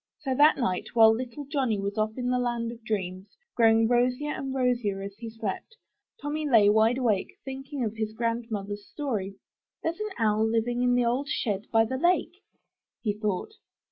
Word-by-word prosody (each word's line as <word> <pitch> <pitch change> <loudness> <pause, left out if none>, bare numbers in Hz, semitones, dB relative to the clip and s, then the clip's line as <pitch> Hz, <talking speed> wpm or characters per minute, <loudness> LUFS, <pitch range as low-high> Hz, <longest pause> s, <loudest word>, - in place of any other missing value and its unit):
So 270 -3 -1
that 295 +4 +5
night, 190 -3 -2
while 220 -1 +7
little 250 +4 -5
Johnny 265 -7 0
was 200 +1 -3
off 215 +1 -1
in 250 0 -1
the 250 - +2
land 240 -1 -1
of 235 -1 -12
dreams, 190 - -4 0.2
growing 225 -1 +5
rosier 250 +4 +1
and 270 -2 -4
rosier 240 -7 0
as 200 0 -7
he 230 +1 -7
slept. 225 - -5 0.4
Tommy 300 -2 -3
lay 215 -5 +6
wide 220 +3 +4
awake, 225 -7 0
thinking 270 0 -5
of 220 -1 -2
his 220 -1 -2
grand 230 +1 -2
mother's 205 -1 -5
story. 215 -10 -3 0.5
'There's 330 +4 -2
an 425 0 -2
owl 215 -1 +2
living 235 +2 0
in 245 0 +3
the 245 -1 +2
old 250 +4 0
shed 210 -7 -2
by 225 0 +4
the 260 +3 -3
lake," 355 +4 +1 0.6
he 210 -3 +1
thought. 210 - -2
230 Hz, 185 wpm, -27 LUFS, 215-260 Hz, 0.6 s, while